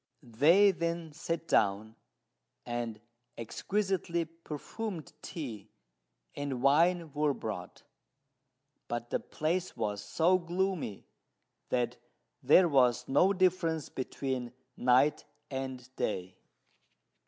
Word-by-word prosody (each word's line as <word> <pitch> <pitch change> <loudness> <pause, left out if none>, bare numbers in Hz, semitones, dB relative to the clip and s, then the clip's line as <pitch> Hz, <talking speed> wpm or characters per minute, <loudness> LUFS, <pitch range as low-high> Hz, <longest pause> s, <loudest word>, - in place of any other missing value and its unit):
They 155 - +5
then 170 -2 -3
sat 165 +1 -3
down, 105 +2 +2 0.7
and 120 -2 -3 0.4
exquisitely 185 - -1
perfumed 165 +3 -6
tea 110 - -6 0.7
and 135 -3 -3
wine 165 +2 +3
were 150 -1 +1
brought; - - -6 1.0
but 120 0 -4
the - - +1
place 170 +4 -2
was 105 -2 -2
so 180 +3 +3
gloomy 175 - -2 0.6
that 125 -1 0 0.4
there 150 +7 +6
was 125 -6 +3
no 180 +8 +4
difference 180 -5 +1
between 130 -2 -3 0.2
night 130 +5 +3 0.3
and 130 -2 -4
day. 95 -3 -3
145 Hz, 95 wpm, -31 LUFS, 120-170 Hz, 1.0 s, there